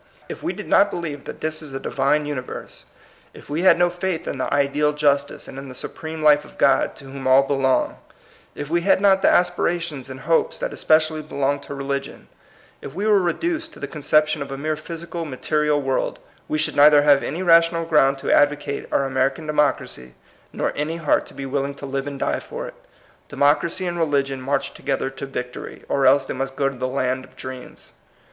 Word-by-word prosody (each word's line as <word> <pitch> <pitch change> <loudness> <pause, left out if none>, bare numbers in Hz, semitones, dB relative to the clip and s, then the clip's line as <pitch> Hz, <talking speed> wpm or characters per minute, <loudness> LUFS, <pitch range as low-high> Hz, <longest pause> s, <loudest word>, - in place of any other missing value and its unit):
If - - -8
we - - -1
did - - -8
not 200 +1 +5
believe 155 -7 -5
that - - -8
this 155 0 -2
is 150 -3 -10
a 135 - -3
Divine 140 +3 0
universe; 140 -4 -6 0.5
if - - -13
we 155 +3 -1
had 185 - +6
no 175 0 +3
faith 175 -1 -3
in - - -4
the - - -2
ideal 145 +1 +2
justice 145 -1 0
and 135 - -8
in 135 0 -9
the 130 - -10
supreme 160 +4 -6
life 150 -1 +5
of - - -16
God 135 -1 +3
to 140 - -12
whom 135 0 -6
all 130 +1 +6
belong; 135 -2 +1 0.6
if 145 - -5
we 170 +3 +1
had 190 +1 +3
not 195 -1 +4
the - - +5
aspirations 170 -6 0
and 130 0 -8
hopes 165 -1 +1
that - - -4
especially 155 0 +2
belong 145 -2 -1
to 140 - -8
religion; 140 0 -5 0.5
if 135 - -9
we 200 +3 -2
were 210 -2 +5
reduced 325 - -2
to - - -13
the - - -4
conception 155 +1 +1
of 140 0 -5
a 135 - -4
mere 155 +2 -1
physical, 165 +2 -6
material 150 +1 0
world, 135 -2 -1 0.2
— - - -33
we 155 - 0
should 155 - 0
neither 145 0 +7
have 145 -1 +5
any 170 +6 -3
ra 170 -2 +8
tional 165 0 -3
ground 135 -4 +4
to - - -2
advocate 145 -1 +2
our 140 - +2
American 135 +3 0
democracy, 145 - -1 0.4
nor - - -2
any 155 +3 -2
heart 160 -3 +1
to - - -15
be 135 - -5
willing 140 +1 -2
to 140 - -8
live 135 0 -3
and 140 -1 -5
die - - 0
for - - -7
it. - - -9 0.6
Democracy 160 +6 +1
and 175 -1 -3
reli 145 -4 +2
gion 135 -1 -6
march 135 +1 -2
together 135 - -2
to 135 +1 -7
victory, 125 -2 -7
or 135 -1 +2
else 135 +1 +5
they - - -4
must 135 +1 -4
go 140 - +1
to 135 - -10
the 130 - -1
land 130 0 -1
of - - -17
dreams. 130 -1 -9
145 Hz, 215 wpm, -22 LUFS, 135-160 Hz, 0.6 s, ra